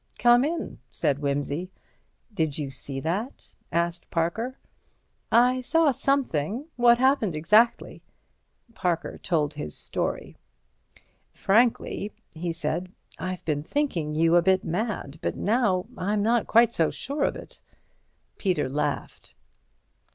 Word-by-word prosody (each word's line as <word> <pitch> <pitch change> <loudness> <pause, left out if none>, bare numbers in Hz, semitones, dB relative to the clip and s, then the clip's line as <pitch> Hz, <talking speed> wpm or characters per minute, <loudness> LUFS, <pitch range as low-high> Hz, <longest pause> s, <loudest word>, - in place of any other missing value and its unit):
"Come 240 +1 +5
in," 325 - -3
said 140 +3 0
Wimsey. 145 +4 -2 0.6
"Did 160 -6 -1
you 145 -3 -3
see 135 +1 -4
that?" 195 - -4 0.2
asked 170 +1 -1
Parker. 220 +10 -1 0.7
"I 250 +2 +4
saw 325 +2 +3
something. 250 - 0
What 240 -1 +5
happened 255 - +2
exactly?" 210 +10 +3 0.7
Parker 175 -5 -2
told 155 -5 0
his 75 0 -5
story. - - -3 0.9
"Frankly," 215 -1 +1 0.2
he 170 +1 -3
said, 175 +2 -3 0.3
"I've 185 +1 -5
been 150 -2 0
thinking 165 - -2
you 165 +2 +3
a - - +5
bit 190 +1 +3
mad, 175 -5 -3
but - - -2
now 205 -4 +1
I'm 205 0 -1
not 230 +2 +2
quite 230 0 +5
so 165 -2 +2
sure 280 +2 -3
of - - +1
it." - - -11 0.8
Peter 180 -9 0
laughed. 145 +2 -4
185 Hz, 120 wpm, -26 LUFS, 160-240 Hz, 0.9 s, Come